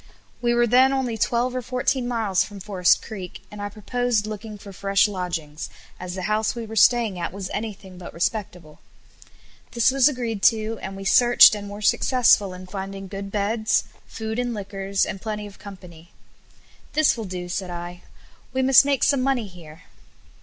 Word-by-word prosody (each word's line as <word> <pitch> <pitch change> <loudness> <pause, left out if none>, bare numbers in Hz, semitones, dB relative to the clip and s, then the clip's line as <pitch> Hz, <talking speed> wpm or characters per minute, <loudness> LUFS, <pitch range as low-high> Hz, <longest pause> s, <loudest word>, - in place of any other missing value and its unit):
We 240 0 +1
were 240 0 +4
then 255 +3 +5
only 260 -4 -1
twelve 240 +3 0
or 255 - -1
fourteen 250 +1 -1
miles 220 -6 +1
from 205 -1 -10
Forest 185 -2 +2
Creek, 190 -5 -8
and 210 0 -8
I 205 - -3
proposed 220 +1 -1
looking 215 0 -7
for 200 -1 -12
fresh 195 +2 +2
lodgings, 170 -6 -5 0.3
as 180 0 -6
the 185 - -5
house 215 +3 0
we 235 -1 -5
were 225 0 -8
staying 225 -3 +3
at 170 - -3
was 190 0 -6
anything 200 -4 -6
but 175 - -9
respectable. 175 -4 -4 0.9
This 235 +2 +3
was 270 +1 +4
agreed 235 -6 -4
to, 220 0 +2
and 195 0 -6
we 195 - -8
searched 240 +4 +7
and 205 -1 -5
were 205 +1 -8
successful 225 -4 +3
in 185 0 -9
finding 195 0 -7
good 195 0 -6
beds, 215 +2 +1 0.2
food 220 +1 -5
and 245 -1 -2
liquors, 195 -1 -2
and 190 - -6
plenty 210 -2 -4
of 205 -1 -12
company. 180 -4 -12 0.8
"This 310 0 +3
will 225 -2 -5
do," 180 -2 -6
said 180 +1 -4
I; 175 0 -7 0.5
"we 260 0 0
must 265 +1 +7
make 280 -2 0
some 280 -2 +3
money 260 -3 0
here." 170 -4 -13
210 Hz, 180 wpm, -23 LUFS, 190-235 Hz, 0.9 s, searched